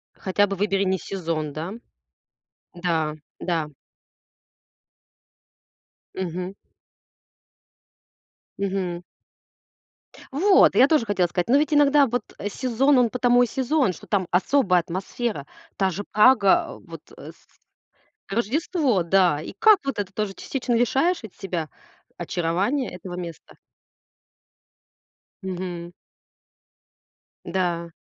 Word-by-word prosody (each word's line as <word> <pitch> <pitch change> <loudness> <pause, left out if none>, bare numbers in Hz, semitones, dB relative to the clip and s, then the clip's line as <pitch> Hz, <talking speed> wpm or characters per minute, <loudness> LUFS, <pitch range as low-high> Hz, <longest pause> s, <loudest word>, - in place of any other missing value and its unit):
Хотя 205 +2 +1
бы 195 - -3
выбери 195 0 0
не 190 -1 +1
сезон, 165 -6 -4
да? 160 +3 -5 1.1
Н-да, 165 -3 -1 0.3
да. 165 -4 -1 2.5
Мгм. 185 +1 -4 2.1
Мгм. 185 -3 -2 1.3
Вот, 375 +7 +5
и - - +3
я 265 - +7
тоже 300 -7 +2
хотела 190 -4 +1
сказать. 175 0 -2
Но 270 - +5
ведь 300 0 +1
иногда 290 0 +5
вот 245 -2 -2 0.3
сезон, 260 +5 +2
он 240 -2 +3
потому 245 0 +3
и - - +1
сезон, 265 -5 0
что - - -13
там 190 -4 0
особая 185 -1 +3
атмосфера. 185 - -4 0.3
Та 190 -1 +1
же 190 +3 -5
Прага, 215 -3 +5
а, - - -9
вот, - - -11 0.2
э, - - -10
с - - -28 0.7
Рождество, 250 - 0
да. 175 -3 +3
И - - -8
как 435 -3 +6
вот 275 -6 -2
это 195 -2 -3
тоже 210 -1 -2
частично 250 +3 -3
лишаешь 270 +8 +1
ведь 215 - -10
себя 175 -5 -4 0.5
очарования 195 - -1
этого 180 0 -8
места? 170 -3 -8 1.9
Мгм. 180 -2 -5 1.5
Н-да. 170 -2 -2
195 Hz, 110 wpm, -24 LUFS, 175-250 Hz, 2.5 s, я